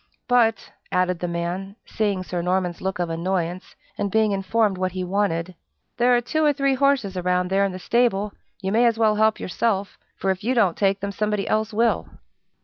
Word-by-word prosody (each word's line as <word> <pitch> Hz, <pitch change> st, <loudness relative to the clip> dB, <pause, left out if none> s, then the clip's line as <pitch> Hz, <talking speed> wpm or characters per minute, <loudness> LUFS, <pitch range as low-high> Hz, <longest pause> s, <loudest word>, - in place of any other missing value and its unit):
"But," 230 Hz, -3 st, +2 dB, 0.2 s
added 180 Hz, -1 st, +1 dB
the 175 Hz, -, -2 dB
man, 175 Hz, +3 st, -4 dB
seeing 205 Hz, -4 st, -1 dB
Sir 180 Hz, -1 st, -3 dB
Norman's 180 Hz, 0 st, -1 dB
look 190 Hz, 0 st, -2 dB
of 175 Hz, -2 st, -2 dB
annoyance, 175 Hz, +1 st, -3 dB, 0.2 s
and 200 Hz, -, 0 dB
being 220 Hz, +1 st, +2 dB
informed 200 Hz, +1 st, +1 dB
what 185 Hz, -1 st, -1 dB
he 185 Hz, -1 st, -3 dB
wanted, 185 Hz, -2 st, -1 dB, 0.4 s
"there 245 Hz, +1 st, +4 dB
are 240 Hz, -, +2 dB
two 310 Hz, +6 st, -1 dB
or 300 Hz, -, +5 dB
three 275 Hz, -1 st, +1 dB
horses 265 Hz, -7 st, +1 dB
around 180 Hz, 0 st, 0 dB
there 195 Hz, +1 st, +3 dB
in 195 Hz, -, -1 dB
the 185 Hz, -, -6 dB
stable, 210 Hz, 0 st, +1 dB
and -, -, -28 dB, 0.3 s
you 190 Hz, -1 st, -2 dB
may 235 Hz, +3 st, +4 dB
as 230 Hz, -1 st, +1 dB
well 220 Hz, -1 st, +3 dB
help 220 Hz, 0 st, +3 dB
yourself, 200 Hz, +1 st, -1 dB, 0.2 s
for 195 Hz, -, 0 dB
if 190 Hz, +2 st, -4 dB
you 250 Hz, +4 st, 0 dB
don't 200 Hz, -8 st, +3 dB
take 195 Hz, -1 st, +1 dB
them, 200 Hz, 0 st, -3 dB
somebody 210 Hz, 0 st, -1 dB
else 215 Hz, 0 st, 0 dB
will." 230 Hz, +2 st, +1 dB
195 Hz, 205 wpm, -23 LUFS, 185-225 Hz, 0.4 s, or